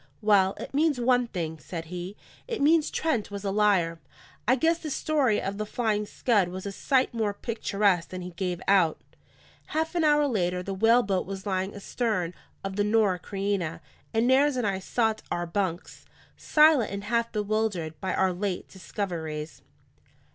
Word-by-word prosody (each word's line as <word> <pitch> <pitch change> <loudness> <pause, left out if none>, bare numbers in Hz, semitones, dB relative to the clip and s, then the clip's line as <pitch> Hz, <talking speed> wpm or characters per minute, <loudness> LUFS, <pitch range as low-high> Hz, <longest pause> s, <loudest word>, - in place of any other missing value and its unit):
"Well, 200 -2 +4
it - - -7
means 295 -2 +2
one 245 0 +3
thing," 160 -6 -4
said 165 +2 -6
he. 180 +4 -7 0.3
"It 470 -2 -3
means 310 +2 +4
Trent 305 -10 -1
was 200 -1 -6
a 195 - -1
liar. 195 -5 +2 0.5
I 255 - +5
guess 325 +5 +2
the 315 - -5
story 280 -7 +1
of 200 +1 -4
the 215 - -1
Flying 210 -2 -1
Scud 205 -6 +1
was 185 +2 -7
a 200 - -3
sight 260 +6 +1
more 215 -3 -1
picturesque 200 -6 0
than 185 0 -6
he 180 - -7
gave 180 0 -3
out." 185 -5 +4 0.7
Half 320 +2 -1
an 345 -2 +1
hour 295 -1 +4
later, 180 -8 0
the 195 - -4
whaleboat 210 -2 +3
was 195 -1 -6
lying 190 0 -2
astern 200 -4 -2 0.3
of 195 0 -4
the 205 - +3
Norah 210 -3 +2
Creina; 195 -5 -2 0.3
and 225 0 +2
Nares 270 +3 +4
and 250 -3 -1
I 195 -2 0
sought 220 +2 0
our 175 0 -2
bunks, 175 0 -3 0.3
silent 300 -6 +4
and 200 0 -4
half 230 +2 0
bewildered 205 -7 -2
by 190 - -1
our 190 -1 +2
late 185 0 -3
discoveries. 165 -5 -5
205 Hz, 170 wpm, -27 LUFS, 185-240 Hz, 0.7 s, I